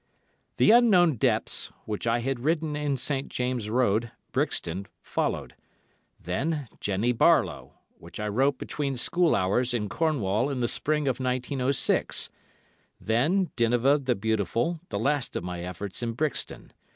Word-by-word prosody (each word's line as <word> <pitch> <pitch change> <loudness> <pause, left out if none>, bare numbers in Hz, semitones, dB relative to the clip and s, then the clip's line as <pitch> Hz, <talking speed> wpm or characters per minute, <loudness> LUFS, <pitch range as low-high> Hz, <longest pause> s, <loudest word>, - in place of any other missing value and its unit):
"The - - +5
Unknown 190 - +5
Depths," - - +1 0.2
which 105 +1 -3
I 115 +1 +2
had 135 0 -2
written 155 +2 0
in 145 -2 -1
St. 135 +1 -1
James' 125 -4 -2
Road, 115 -1 +1 0.2
Brixton, 90 +4 -1
followed; - - -2 0.7
then 145 - -2
"Jennie 105 +5 0
Barlowe," 115 - +2 0.3
which 85 +4 -10
I 105 - -2
wrote 130 +6 +1
between 140 -3 -3
school 175 +6 +2
hours 110 +7 +1
in 105 -3 -2
Cornwall 120 -4 0
in 140 - -3
the 120 - +1
Spring 150 +3 0
of 130 -1 0
1906; 130 +1 0 0.7
then 155 - +1
"Dinevah 120 +4 +3
the 125 -2 +1
Beautiful," 110 - -1
the - - -3
last 145 -1 0
of - - -2
my 90 -1 -5
efforts 90 +4 -5
in 115 -1 -2
Brixton. 150 +5 -2
125 Hz, 140 wpm, -27 LUFS, 110-145 Hz, 0.7 s, The